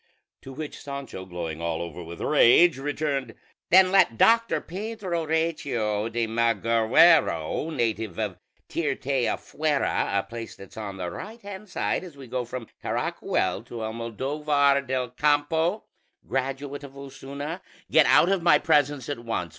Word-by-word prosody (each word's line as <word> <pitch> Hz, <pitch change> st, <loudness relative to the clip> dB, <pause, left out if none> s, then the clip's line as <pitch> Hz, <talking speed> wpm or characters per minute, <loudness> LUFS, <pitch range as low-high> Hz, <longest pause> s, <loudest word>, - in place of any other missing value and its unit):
To 135 Hz, -, -10 dB
which 150 Hz, +2 st, -7 dB
Sancho, 140 Hz, -9 st, -7 dB
glowing 85 Hz, -3 st, -5 dB
all 85 Hz, -1 st, -2 dB
over 85 Hz, 0 st, -6 dB
with 85 Hz, 0 st, -9 dB
rage, 150 Hz, +3 st, +5 dB
returned, 140 Hz, -4 st, -2 dB, 0.3 s
"Then 185 Hz, +1 st, +6 dB
let 190 Hz, -12 st, +4 dB
Doctor 230 Hz, -, +4 dB
Pedro 185 Hz, -3 st, -4 dB
Recio 140 Hz, -10 st, -1 dB
de 115 Hz, 0 st, 0 dB
Mal 115 Hz, +1 st, +1 dB
aguero, 115 Hz, -, +3 dB
native 110 Hz, -, -2 dB
of -, -, -3 dB, 0.3 s
Tirteafuera, 135 Hz, -1 st, -1 dB
a 100 Hz, -, +1 dB
place 115 Hz, -1 st, -8 dB
that's 100 Hz, -, -13 dB
on 100 Hz, -3 st, -6 dB
the 90 Hz, -2 st, -4 dB
right 225 Hz, +2 st, -8 dB
hand 200 Hz, +1 st, -9 dB
side -, -, -1 dB
as 170 Hz, -6 st, -11 dB
we 135 Hz, -, -10 dB
go 125 Hz, 0 st, -3 dB
from 120 Hz, 0 st, -6 dB, 0.2 s
Caracuel 95 Hz, -, -1 dB
to 120 Hz, -1 st, -7 dB
Almodóvar 140 Hz, +5 st, 0 dB
del 130 Hz, -2 st, -2 dB
Campo, 150 Hz, -, +1 dB, 0.4 s
graduate 135 Hz, +2 st, -3 dB
of 140 Hz, -1 st, -11 dB
Osuna, 140 Hz, +4 st, -7 dB, 0.3 s
get 160 Hz, -, +6 dB
out 175 Hz, -, +6 dB
of 195 Hz, -2 st, +1 dB
my 165 Hz, -3 st, +6 dB
presence 145 Hz, -3 st, +1 dB
at 145 Hz, -4 st, -3 dB
once! 115 Hz, -7 st, -3 dB
135 Hz, 145 wpm, -26 LUFS, 115-155 Hz, 0.4 s, Then